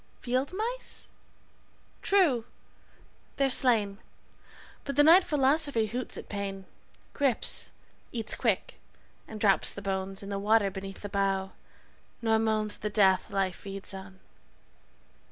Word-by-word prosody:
Field 255 +4 -1
mice?' 460 +6 -5 0.9
True, 320 - +3 0.9
they're 275 -1 +2
slain, 215 -6 +2 0.8
But 280 - -4
the 290 - +6
night 340 +5 +8
philosophy 285 -5 +2
hoots 240 +3 -4
at - - -8
pain, 195 -1 -5 0.5
Grips, 275 -5 +1 0.4
eats 225 -3 -3
quick, - - -1 0.5
and 220 - -8
drops 200 -2 +3
the 200 - -7
bones 195 0 -2
In 200 - -7
the 200 -1 -2
water 205 -1 +3
beneath 195 0 -7
the 205 - -5
bough, 195 -1 0 0.7
nor 225 -1 +2
moans 215 -1 +1
At - - -21
the 210 - -1
death 195 -3 +3
life 190 -2 -1
feeds 195 0 -7
on). 190 0 -10
215 Hz, 130 wpm, -29 LUFS, 195-260 Hz, 0.9 s, night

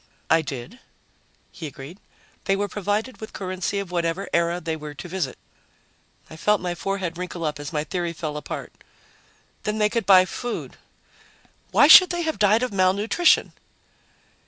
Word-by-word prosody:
"I 160 0 +5
did," 140 - -7 0.7
he 165 - -7
agreed. 140 +6 -10 0.5
"They 195 - +2
were 205 +1 -1
provided 210 +5 -3
with 220 - -8
currency 185 +1 -3
of 200 -3 -4
whatever 170 +2 -1
era 170 +1 +1
they 160 -1 -3
were 150 -1 -8
to 175 - -8
visit." 175 -7 -3 0.9
I - - -11
felt 210 +4 +2
my 175 -1 -3
forehead 180 -1 -3
wrinkle 180 -2 -5
up 150 -1 -3
as 145 0 -6
my 150 -2 -1
theory 175 +2 -3
fell 155 -2 -5
apart. 150 - -6 0.9
"Then 210 0 -2
they 210 -1 +2
could 230 -3 -2
buy 185 -2 +7
food. 240 +5 -6 0.9
Why 290 - +5
should 365 +4 +10
they 345 -1 -2
have 315 -8 -2
died 210 +3 +4
of 250 - -2
malnutrition?" 200 - +3
185 Hz, 160 wpm, -23 LUFS, 165-210 Hz, 0.9 s, should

